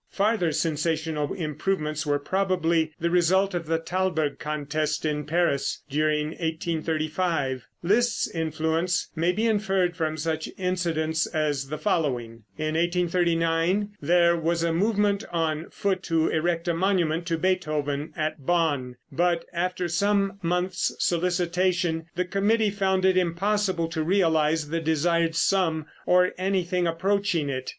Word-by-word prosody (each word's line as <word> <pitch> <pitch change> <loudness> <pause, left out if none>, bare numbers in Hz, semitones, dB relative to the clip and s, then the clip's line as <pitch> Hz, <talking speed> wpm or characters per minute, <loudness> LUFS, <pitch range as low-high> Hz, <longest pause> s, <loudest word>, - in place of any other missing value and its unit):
Farther 200 -4 +1
sensational 160 -1 -1
improvements 155 -2 -2
were 145 0 +2
probably 170 -1 0
the 170 +1 0
result 185 +3 +3
of 170 -3 -3
the 165 0 +1
Thalberg 165 -3 -1
contest 150 +1 -2
in 150 -1 -1
Paris 155 -4 0
during 150 +1 +1
1835. 160 -4 -2 0.2
Liszt's 225 +6 +2
influence 160 +2 -1
may 170 +2 +2
be 215 +5 -1
inferred 195 -5 +1
from 155 -2 -2
such 160 0 -2
incidents 165 -4 0
as 150 -4 -1
the 155 - -3
following: 125 - -1
In 155 0 -2
1839 170 +2 +1
there 170 0 +4
was 170 0 0
a 165 -1 +1
movement 205 +2 +1
on 160 -2 -1
foot 190 -2 -1
to 165 -1 +2
erect 170 +2 0
a 170 - +2
monument 170 -2 +1
to 165 -2 0
Beethoven 155 -5 -1
at 155 -2 -2
Bonn, 145 -6 0 0.2
but 175 0 +1
after 180 +1 -1
some 200 +2 +1
months' 180 +1 -1
solicitation 175 -1 0
the 180 +1 0
committee 205 +3 +1
found 190 -2 +1
it 190 -1 +4
impossible 185 0 +1
to 165 -1 -2
realize 160 -3 +2
the 165 0 -1
desired 165 +1 +1
sum, 165 -2 +1 0.2
or 180 0 +4
anything 185 -2 0
approaching 185 -2 0
it. 130 -1 -4
170 Hz, 130 wpm, -26 LUFS, 155-185 Hz, 0.2 s, there